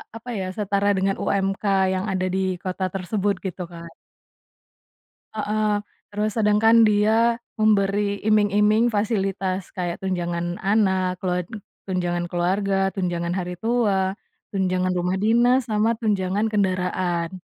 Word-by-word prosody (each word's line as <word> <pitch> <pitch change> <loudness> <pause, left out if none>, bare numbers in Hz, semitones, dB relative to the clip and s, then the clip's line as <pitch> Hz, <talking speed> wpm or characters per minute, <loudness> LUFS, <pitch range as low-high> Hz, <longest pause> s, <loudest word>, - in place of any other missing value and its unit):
apa 230 +2 -9
ya 185 - -2
setara 200 -1 0
dengan 195 +1 +1
UMK 195 +1 -1 0.3
yang 185 +2 -2
ada 185 -1 -1
di - - +1 0.2
kota 185 0 -2
tersebut 200 +2 -1
gitu 185 0 -4
kan. 170 0 -9 1.4
Heeh, 210 -1 0 0.3
terus 210 +1 -2
sedangkan 225 +2 +5
dia 220 +3 +3 0.2
memberi 205 -1 +2
iming-iming 210 +2 +3
fasilitas 195 -3 -1
kayak 175 0 -4
tunjangan 175 -2 -2
anak 190 -3 +1
kelua 180 -1 0 0.5
tunjangan 175 -2 -1
keluarga, 195 +3 0
tunjangan 175 -2 -2
hari 180 -1 -3
tua, 205 -5 +1 0.4
tunjangan 185 -1 0
rumah 180 +2 0
dinas 240 +4 +3
sama 220 +2 +2
tunjangan 205 -1 0
kendaraan. 185 -2 -1
195 Hz, 115 wpm, -23 LUFS, 185-210 Hz, 1.4 s, sedangkan